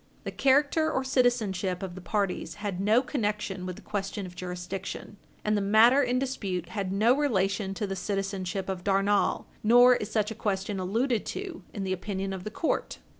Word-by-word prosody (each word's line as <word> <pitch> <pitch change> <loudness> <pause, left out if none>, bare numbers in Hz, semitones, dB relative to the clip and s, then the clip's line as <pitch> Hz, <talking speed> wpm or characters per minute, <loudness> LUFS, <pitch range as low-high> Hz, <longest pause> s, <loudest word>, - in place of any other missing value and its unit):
The - - -4
character 285 +4 +3
or 265 - 0
citizenship 220 -8 +1
of 185 -2 -5
the 185 - -9
parties 200 0 -2
had 205 -3 -4
no 220 +5 +4
connection 210 -8 -2
with 185 - -4
the 210 - -13
question 195 0 -3
of 180 -1 -10
jurisdiction, 180 +3 -6 0.3
and 210 0 +2
the 205 - +1
matter 220 +7 +6
in 250 -2 +1
dispute 195 -10 -2
had 195 -3 -3
no 220 +6 +4
relation 195 -8 0
to 210 - -2
the 195 -1 -3
citizenship 195 0 -3
of 190 -2 -4
Darnall. 200 0 +2 0.2
Nor 245 +3 +7
is 210 - -5
such 215 -1 0
a - - -2
question 195 -1 -2
alluded 225 +5 0
to 375 -4 -5
in 200 - -4
the 190 -1 -1
opinion 195 +1 -3
of 185 -1 -6
the - - -2
court. 310 +9 -2
205 Hz, 185 wpm, -28 LUFS, 190-235 Hz, 0.3 s, Nor